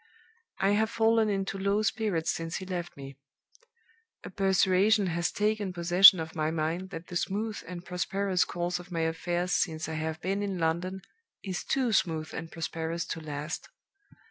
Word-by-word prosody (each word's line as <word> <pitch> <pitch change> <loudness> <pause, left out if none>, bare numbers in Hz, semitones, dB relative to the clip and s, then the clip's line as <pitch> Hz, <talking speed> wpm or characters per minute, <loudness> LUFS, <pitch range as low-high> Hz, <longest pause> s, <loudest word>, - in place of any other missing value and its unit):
"I 195 +1 +2
have 215 +2 +2
fallen 225 -1 +3
into 195 -1 -2
low 200 +2 +1
spirits 205 -6 0
since 165 0 -4
he 190 - -4
left 175 -3 -5
me. 135 -1 -10 1.0
A - - -8
persuasion 195 +2 +3
has 170 0 0
taken 210 -2 0
possession 180 +2 +8
of 160 0 -5
my 155 -1 0
mind 165 +3 -2
that 165 -2 -7
the 180 - -9
smooth 210 +5 -2
and 175 0 -7
prosperous 190 +1 0
course 175 0 -2
of 175 +1 -12
my 165 -1 -1
affairs 175 +2 -1
since 160 -2 0
I 160 - -4
have 160 0 -3
been 195 +3 -1
in 200 -2 -2
London 175 +3 -1 0.4
is 185 -3 -4
too 255 -4 0
smooth 160 -5 0
and 165 0 -6
prosperous 165 0 -3
to - - -7
last. 150 0 -5
180 Hz, 170 wpm, -29 LUFS, 165-195 Hz, 1.0 s, possession